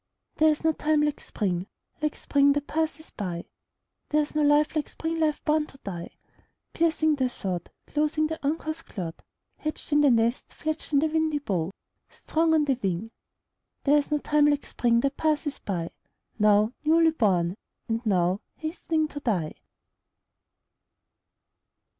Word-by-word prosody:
There 315 0 +5
is 305 0 0
no 320 - +4
time 305 -1 +1
like 295 -1 -1
Spring, 185 -3 -2 0.3
Like 300 -1 0
Spring 280 0 +3
that 290 0 -2
passes 315 0 -2
by; 175 -5 -4 0.6
There 305 0 +3
is 295 - -8
no 305 - +1
life 295 +1 +4
like 305 - -1
Spring 325 0 -3
life 305 -2 0
born 305 0 +2
to - - -16
die, 175 -4 -6 0.6
Piercing 320 -1 +2
the 260 -2 +1
sod, 185 -7 -4 0.2
Clothing 305 +1 +1
the 320 0 -4
uncouth 315 +2 -2
clod, 170 -5 -6 0.4
Hatched 310 0 -5
in 295 0 +5
the 290 - +6
nest, 235 +1 +1
Fledged 315 0 -3
on 285 -1 +4
the - - +3
windy 315 -1 +1
bough, 185 - -1 0.4
Strong 320 0 +1
on 305 -1 +3
the 270 -3 0
wing: 195 +3 -2 0.7
There 295 +1 +5
is 285 - -4
no 300 - +2
time 295 0 +3
like 290 -1 +1
Spring 235 -1 +2
that 275 +1 -1
passes 300 -2 0
by, 170 -4 -3 0.5
Now 210 +2 +4
newly 325 +1 +5
born, 185 - +1 0.3
and 230 +1 -1
now 185 -2 +2
Hastening 315 -1 -1
to 290 - -6
die. 185 - -1
290 Hz, 160 wpm, -27 LUFS, 215-310 Hz, 0.7 s, the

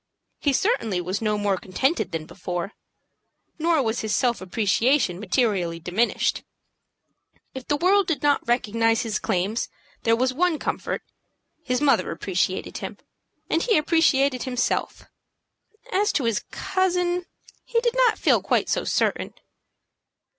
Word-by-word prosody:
He 285 - +2
certainly 255 - +1
was 185 +4 -3
no 210 -1 +1
more 205 -2 +1
contented 220 - -1
than 160 -1 -4
before, 180 +2 -5 0.9
nor 325 -3 +2
was 225 0 -1
his 220 -1 -1
self 240 -4 +1
appreciation 210 +2 +1
materially 195 -7 0
diminished. 185 +8 0 1.1
If 260 -1 -8
the 290 - +1
world 375 +3 +3
did 295 -6 -1
not 290 -4 +2
recognize 225 -1 +2
his 225 -3 -2
claims, 195 +6 -1 0.3
there 230 0 +3
was 255 +2 +1
one 345 +3 +1
comfort, - - -3 0.6
his 250 -1 -1
mother 290 -2 +3
appreciated - - -2
him, - - -6 0.5
and 325 - +1
he 450 +2 +3
appreciated 280 -5 +3
himself. 250 -2 -1 0.9
As 415 +2 +2
to 280 - +1
his 230 -3 0
cousin, 360 -1 0 0.4
he 465 - 0
did 475 -1 +1
not - - +4
feel - - +3
quite - - +1
so - - 0
certain. - - 0
250 Hz, 135 wpm, -24 LUFS, 210-325 Hz, 1.1 s, not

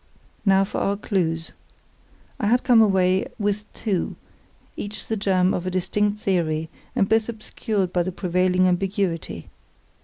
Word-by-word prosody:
Now 195 0 +5
for 195 - -3
our 200 0 0
clues. 165 -5 -1 0.9
I 205 - 0
had 245 +3 +3
come 240 -3 +6
away 190 -3 +3
with 205 0 -2
two, 200 -6 -2 0.6
each 205 +1 -6
the 225 - -2
germ 190 -3 +2
of 180 0 -2
a - - +1
distinct 205 +3 0
theory, 160 -6 -1 0.2
and 195 - +3
both 220 +2 +2
obscured 215 -4 -2
by 180 - +2
the 180 +2 -2
prevailing 180 0 +2
ambiguity. 180 - -1
190 Hz, 145 wpm, -23 LUFS, 180-210 Hz, 0.9 s, come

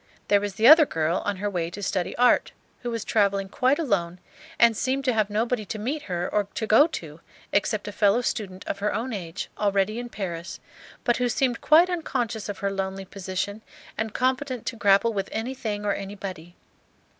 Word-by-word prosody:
There 205 -1 +5
was 205 -1 -4
the 220 +2 +4
other 310 0 +9
girl 160 +2 0
on 205 - 0
her 205 +2 -2
way 175 -4 -2
to 200 +4 -8
study 185 -2 -1
art, 245 0 +3 0.3
who 245 - -3
was 230 -2 -3
travelling 200 -2 +1
quite 255 +7 +2
alone, 185 - -1 0.4
and 235 -1 +5
seemed 265 +4 -1
to 255 - +2
have 215 -2 +1
nobody 225 +2 0
to 215 - -5
meet 265 +8 -3
her 175 0 -1
or 210 -1 0
to 220 - -1
go 225 +8 +6
to 160 - -7 0.3
except 205 +1 0
a - - -3
fellow 205 +3 +3
student 195 -6 -4
of 200 - -4
her 210 +1 0
own 235 +3 -3
age, 180 -2 -5
already 205 +2 +1
in 240 0 -6
Paris, 175 -6 -5 0.4
but 240 - +2
who 250 -1 +1
seemed 245 0 0
quite 330 +4 +6
unconscious 245 - -2
of 205 - -4
her 200 - +1
lonely 195 0 -3
position 195 +2 -4 0.3
and 220 0 -3
competent 255 -1 -1
to - - -3
grapple 205 +2 +3
with 195 -2 -2
anything 220 -3 -3
or 205 - +2
anybody. 190 -4 -7
210 Hz, 195 wpm, -25 LUFS, 195-240 Hz, 0.4 s, other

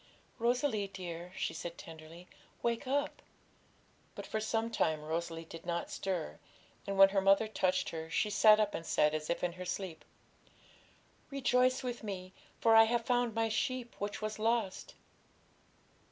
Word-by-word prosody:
'Rosalie, 235 -3 +1
dear,' 180 -2 -7
she - - -2
said 170 0 -6
tenderly, 165 +2 -11 0.4
'wake 235 +3 -1
up!' 285 +2 -1 0.9
But - - -7
for 220 - -2
some 225 +1 -1
time 155 -7 0
Rosalie 165 +1 -3
did 165 0 -10
not 170 0 -3
stir, 180 - -3 0.5
and, 200 0 -2
when 195 0 +9
her 195 0 +1
mother 195 +3 +4
touched 185 -3 0
her, 160 0 -6
she 210 +5 0
sat 215 +1 +6
up, 210 -1 +1
and - - -4
said, 150 -2 +2
as 155 0 -3
if 170 - -1
in 175 - +1
her 180 +1 -7
sleep 180 -2 -4 1.3
'"Rejoice 255 -2 +2
with 245 -1 -4
Me, 185 -3 -6 0.3
for 225 -1 +5
I 225 0 +9
have 235 +1 0
found 245 -2 +1
My 225 0 +2
sheep 245 +2 -2
which 205 +1 -4
was 215 0 -3
lost."' 225 -3 -1
200 Hz, 160 wpm, -33 LUFS, 170-230 Hz, 1.3 s, when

